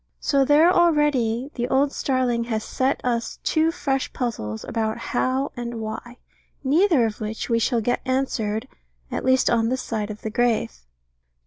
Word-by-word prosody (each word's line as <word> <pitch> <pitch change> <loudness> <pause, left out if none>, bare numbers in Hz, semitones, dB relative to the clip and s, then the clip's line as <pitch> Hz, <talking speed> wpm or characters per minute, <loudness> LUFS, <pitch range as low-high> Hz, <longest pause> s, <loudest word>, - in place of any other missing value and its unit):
So 280 -2 +2
there 300 +5 +5
already 295 -8 +2
the 240 -1 -2
old 275 +2 +2
starling 250 -5 0
has 220 -2 -2
set 265 +1 0
us 235 -2 -1
two 320 +1 +2
fresh 270 -5 -1
puzzles 110 - -3
about 220 -1 -2
How 260 +3 -1
and 240 -1 -5
Why, 220 +3 -6 0.5
neither 300 - +4
of 220 -1 -4
which 220 +3 -4
we 230 - +3
shall 230 0 +1
get 245 +3 0
answered, 255 -4 -1 0.4
at - - -3
least 260 0 +3
on 230 -1 +2
this 255 +1 -2
side 215 -2 -3
of 215 0 -8
the 220 - -3
grave. 235 - +1
245 Hz, 160 wpm, -23 LUFS, 225-270 Hz, 0.5 s, there